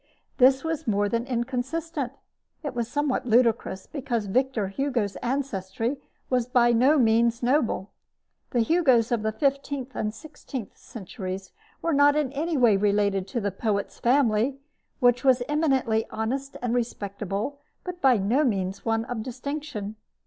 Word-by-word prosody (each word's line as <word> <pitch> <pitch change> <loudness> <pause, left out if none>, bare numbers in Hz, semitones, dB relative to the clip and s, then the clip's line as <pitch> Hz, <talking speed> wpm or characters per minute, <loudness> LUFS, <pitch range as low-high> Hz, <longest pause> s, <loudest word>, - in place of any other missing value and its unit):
This 265 +1 +5
was 320 -2 -3
more 205 -1 +2
than 230 +4 -1
inconsistent. 265 +4 -2 0.5
It 290 - -3
was 235 -2 -2
somewhat 285 -1 -1
ludicrous; 230 -4 +2
because 245 -7 -3
Victor 230 -1 0
Hugo's 235 -3 -1
ancestry 240 -2 -2 0.3
was 250 -2 +1
by 240 -1 +4
no 255 +6 +4
means 235 -1 +3
noble. 240 -6 +1 0.6
The 240 - +1
Hugos 255 -5 +3
of 235 -3 +1
the 220 0 0
fifteenth 275 0 -1
and 215 - -1
sixteenth 265 -3 -8
centuries 190 -3 -7 0.3
were 330 - +1
not 285 +1 +5
in 295 -4 0
any 315 +2 -1
way 235 -6 +5
related 200 -1 +1
to 235 - -2
the 205 -2 -1
poet's 200 +1 -2
family, 245 0 +2 0.4
which 245 0 +3
was 260 -2 +4
eminently 270 -7 +1
honest 265 +5 -3
and 240 -1 0
respectable, 215 +1 -3 0.2
but 360 -1 -7
by 260 -3 +5
no 220 +9 +2
means 195 -6 -1
one 225 0 0
of 245 -3 -4
distinction. 255 -3 -5
245 Hz, 145 wpm, -26 LUFS, 220-275 Hz, 0.6 s, This